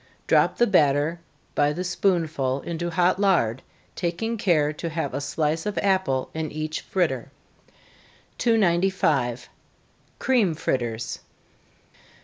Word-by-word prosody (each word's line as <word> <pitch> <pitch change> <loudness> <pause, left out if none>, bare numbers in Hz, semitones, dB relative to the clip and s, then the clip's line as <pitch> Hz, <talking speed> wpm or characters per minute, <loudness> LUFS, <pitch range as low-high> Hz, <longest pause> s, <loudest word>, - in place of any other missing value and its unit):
Drop - - +3
the 240 - +5
batter 150 -4 +2 0.3
by 145 0 +2
the 175 +5 -3
spoonful 160 -8 0
into 170 0 -3
hot 180 +2 +2
lard, 150 - +2 0.3
taking 175 +7 -2
care 160 -9 +2
to 165 +2 -5
have 160 -3 -3
a 140 - -2
slice 155 +4 -1
of 210 - -3
apple 190 -10 +1
in 160 -1 -3
each 155 0 -4
fritter. 140 -9 -1 1.1
295. 175 - +2 0.7
_Cream 215 -12 +2
Fritters. 115 -5 -2
165 Hz, 115 wpm, -24 LUFS, 145-185 Hz, 1.1 s, the